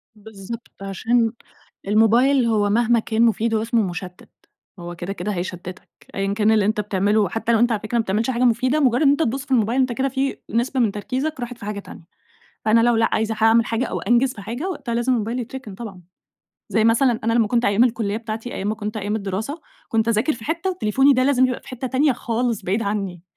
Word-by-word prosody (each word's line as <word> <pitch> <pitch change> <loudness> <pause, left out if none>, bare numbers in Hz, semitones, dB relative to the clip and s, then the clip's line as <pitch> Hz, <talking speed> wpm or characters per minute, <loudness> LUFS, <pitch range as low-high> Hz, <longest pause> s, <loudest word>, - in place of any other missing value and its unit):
بالضبط، 215 +2 -9
عشان 225 +4 0 0.6
الموبايل 235 +5 +4
هو 210 -3 +2
مهما 235 +2 +3
كان 220 +1 -1
مفيد، 230 0 +2
هو 220 - +1
اسمه 230 0 +1
مُشتِّت 180 0 -7 0.5
هو 175 0 -7
كده، 175 +3 -5
كده 195 +3 -4
هيشتِّتك 180 0 -6 0.3
أيًا 195 0 -1
كان 215 +1 +2
اللي 215 -2 +3
أنت 210 0 +1
بتعملُه، 205 +1 +1
حتى 225 +1 -1
لو 220 - +3
أنت 240 0 +3
على 220 - 0
فكرة 225 +2 -2
ما 230 - +2
بتعملش 220 +4 -1
حاجة 250 -1 0
مفيدة، 255 +4 +2
مجرّد 255 -1 +2
إن 280 - +5
أنت 285 - +2
تبُصّ 265 +4 -2
في - - -14
الموبايل 235 +1 +2
أنت 255 -2 +2
كده 270 +3 -1
في 270 +1 -2
نسبة 240 +3 0
من 225 -5 +3
تركيزك 260 +9 -3
راحت 245 0 -5
في 220 - -10
حاجة 210 -1 -4
تانية، 200 - -12 0.6
فأنا 220 +1 +4
لو 240 0 +3
لأ 225 0 +3
عايزة 220 0 0
حاعمل 225 +1 +4
حاجة 230 +3 -1
أو - - -4
أنجز 245 +2 +2
في 205 - -9
حاجة 240 - -4
وقتها 235 -9 -4
لازم 240 +2 +1
الموبايل 230 +1 -1
يتركن 245 -3 -7
طبعًا. 195 -5 -9 0.7
زي 220 - +2
مثلًا 230 +1 +3
أنا 230 0 +1
لمّا 230 -2 +3
كنت 240 +2 +1
أيام 205 +4 +4
الكليّة 225 -4 0
بتاعتي 225 +1 -6
أيام 195 - -3
ما 215 - -1
كنت 215 0 -5
أيام 205 +1 -2
الدراسة، 215 - -4 0.3
كنت 225 0 +1
أذاكر 230 +7 +2
في 225 - -11
حتة 335 +4 -1
وتليفوني 270 - +3
ده 255 0 +2
لازم 260 -2 +3
يبقى 250 - -4
في - - -20
حتة 255 -1 -5
تانية 275 +3 +2
خالص 235 -1 -2
بعيد 200 +5 0
عنّي، 195 -4 -3
225 Hz, 220 wpm, -22 LUFS, 210-245 Hz, 0.7 s, إن